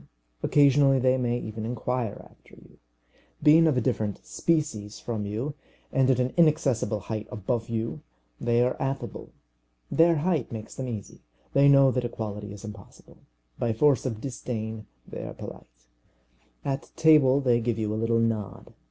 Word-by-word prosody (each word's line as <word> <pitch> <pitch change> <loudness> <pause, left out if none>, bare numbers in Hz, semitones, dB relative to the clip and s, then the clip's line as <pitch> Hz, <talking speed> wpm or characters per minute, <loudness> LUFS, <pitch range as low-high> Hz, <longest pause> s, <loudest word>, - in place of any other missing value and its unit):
Occasionally 140 -1 +4
they 130 0 +3
may 120 -2 0
even 110 -2 -6
inquire 120 -1 -3
after - - -20
you. - - -19 0.6
Being 160 +2 +7
of 150 -5 +2
a - - +2
different 105 -2 -2
species 150 -11 -1
from 110 -4 -4
you, 115 +8 -3 0.4
and 135 -1 +3
at 130 -2 +3
an 125 0 0
inaccessible 145 -10 +2
height 110 0 -5
above 115 +3 -3
you, 115 0 -3 0.4
they 120 0 +2
are 125 - 0
affable. 135 0 -4 0.6
Their 165 +1 +5
height 155 -4 0
makes 110 -2 -7
them 130 - -5
easy. 110 -5 -7 0.3
They 140 +1 +5
know 135 -1 +6
that 125 -1 -1
equality 105 -3 -5
is 100 0 -9
impossible. 105 -1 -13 0.4
By 115 -2 0
force 140 +4 +3
of 115 -4 -4
disdain 110 -4 -5 0.2
they - - -7
are - - -7
polite. - - -11 0.8
At 135 -1 -3
table 150 -4 +5
they 120 -4 +2
give 115 -1 -1
you 105 -1 -1
a 110 - -2
little 115 0 +2
nod. 115 -3 -2
120 Hz, 160 wpm, -26 LUFS, 110-135 Hz, 0.8 s, Being